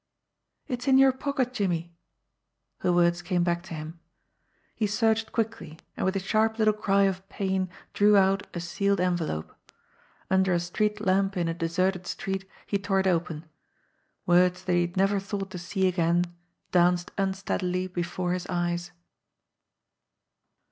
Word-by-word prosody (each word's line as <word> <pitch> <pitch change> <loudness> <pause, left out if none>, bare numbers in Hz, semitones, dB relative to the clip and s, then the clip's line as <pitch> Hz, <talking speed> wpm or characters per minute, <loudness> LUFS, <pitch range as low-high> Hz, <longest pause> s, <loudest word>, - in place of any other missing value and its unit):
"It's 250 -3 -4
in 265 -1 +6
your 270 0 +7
pocket, 260 -1 -2
Jimmie." 175 -6 -1 0.9
Her 180 - +1
words 175 0 +3
came 175 -1 0
back 175 0 0
to 170 - -7
him. 160 +2 -8 0.7
He 215 - 0
searched 220 +1 +1
quickly, 220 -8 -3 0.2
and - - -3
with 190 - 0
a - - +1
sharp 220 +3 +1
little 215 -1 +4
cry 200 -1 +2
of 195 0 -1
pain 190 -2 -1 0.2
drew 205 0 +5
out 195 0 +3
a - - -2
sealed 195 +3 0
envelope. 175 - -1 0.7
Under 190 -1 +2
a 175 - +2
street 210 +5 -1
lamp 195 0 +1
in 175 -1 0
a 165 - 0
deserted 180 +2 -1
street, 190 0 -4 0.2
he 200 - -1
tore 195 -1 +1
it - - -4
open. 165 -3 0 0.8
Words 180 +1 +3
that 185 - 0
he 175 - +4
had 175 +1 -3
never 195 +1 +3
thought 195 -1 -5
to 180 - -6
see 190 +2 0
again 175 -1 +2 0.5
danced 175 0 +3
unsteadily 190 -2 -1
before 175 0 -2
his 180 0 -4
eyes. 175 0 -1
185 Hz, 155 wpm, -27 LUFS, 175-200 Hz, 0.9 s, your